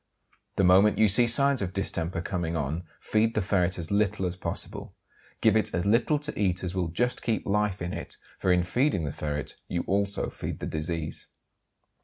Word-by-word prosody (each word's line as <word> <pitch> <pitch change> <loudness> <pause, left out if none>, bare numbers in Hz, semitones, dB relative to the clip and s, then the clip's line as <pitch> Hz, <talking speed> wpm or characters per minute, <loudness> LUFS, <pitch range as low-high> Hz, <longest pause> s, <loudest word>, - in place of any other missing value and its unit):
The - - +2
moment 95 +3 +5
you 110 - +5
see 120 +5 +4
signs 140 +2 +4
of 90 -2 -3
distemper 85 -3 -2
coming 85 -3 -2
on 80 +3 -2
feed 110 +1 +1
the 110 - +2
ferret 90 -1 +1
as 85 0 -5
little 100 -1 +1
as 90 0 -2
possible. 90 - -5 0.5
Give 110 -1 +4
it 110 -3 +1
as 85 - -1
little 115 +8 +3
to 150 +1 -5
eat 95 -3 +1
as 90 -1 -3
will 90 -2 0
just 120 +10 -1
keep 115 -1 -1
life 105 -2 0
in 90 - -3
it, - - -7 0.2
for 95 - +2
in 90 -1 +3
feeding 120 - +1
the 70 - -3
ferret 75 -1 -4
you 85 - -2
also 100 +1 0
feed - - -5
the - - -4
disease. 80 0 -4
95 Hz, 195 wpm, -27 LUFS, 85-110 Hz, 0.5 s, moment